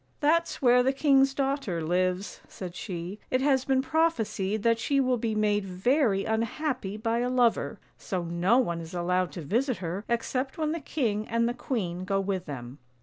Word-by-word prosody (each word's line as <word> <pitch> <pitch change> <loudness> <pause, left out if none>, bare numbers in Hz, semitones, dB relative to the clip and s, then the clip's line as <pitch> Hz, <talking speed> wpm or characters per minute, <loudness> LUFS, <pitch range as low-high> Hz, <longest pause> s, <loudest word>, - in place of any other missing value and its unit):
" - - -38
" - - -41
That's 330 +1 +1
where 250 0 +6
the 265 +2 +2
king's 270 -1 +4
daughter 270 - -1
lives," 185 +3 -1
said 180 -3 -8
she; 180 +1 -5
" - - -39
it 255 - +2
has 265 -2 +2
been 265 -1 +2
prophesied 225 -10 0
that 230 0 +3
she 280 +4 +1
will 255 -2 +2
be 225 -1 -1
made 210 -1 +2
very 195 +3 +1
unhappy 225 -1 -2
by 225 +1 0
a 245 +1 0
lover, 245 -2 +1 0.2
so 185 -2 -3
no 170 +7 +2
one 170 -10 0
is 165 +2 -9
allowed 180 -1 0
to 170 - -6
visit 245 - 0
her 185 +2 -4
except 255 +3 -1
when 310 -1 0
the 335 - -2
king 225 -8 -1
and 230 0 +1
the 240 - -1
queen 190 -8 -3
go 195 +1 0
with 190 -2 -2
them." 130 -1 -7
225 Hz, 200 wpm, -28 LUFS, 185-265 Hz, 0.2 s, where